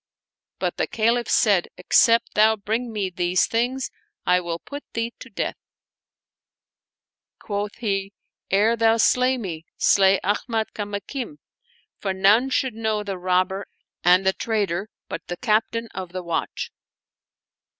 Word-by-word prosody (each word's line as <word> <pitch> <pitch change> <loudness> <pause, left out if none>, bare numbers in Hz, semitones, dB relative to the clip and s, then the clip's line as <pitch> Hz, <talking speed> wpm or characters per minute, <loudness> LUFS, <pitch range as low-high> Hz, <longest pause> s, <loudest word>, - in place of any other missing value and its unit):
* - - -69
But - - -2
the - - 0
Caliph 230 +2 +1
said, 200 -6 +3
" - - -59
Except 230 +5 +4
thou 220 +1 +5
bring 220 +4 -2
me 200 -4 -2
these 175 0 +2
things, 250 +3 -1 0.3
I 180 0 +4
will 170 -2 -3
put 285 +11 -8
thee 230 +1 -2
to 260 - -10
death." 210 - -3 1.8
Quoth 205 0 -4
he, 195 -4 -2 0.2
" - - -70
Ere 210 +4 +3
thou 225 0 +3
slay 255 +3 +3
me, 175 -9 -5
slay 195 -1 +5
.^miad 220 +2 -1
Kamakim, 210 +7 -5 0.6
for 195 -2 -1
none 210 +7 +4
should 260 -1 0
know 220 -1 -1
the 195 -2 -5
robber 185 +2 0 0.4
and 180 +2 +5
the 190 - +4
traitor 205 -3 -1 0.2
but - - -6
the 175 - -4
Captain 230 +1 0
of 185 -2 -6
the 185 -1 -4
Watch." 170 -1 -3
210 Hz, 145 wpm, -23 LUFS, 190-230 Hz, 1.8 s, thou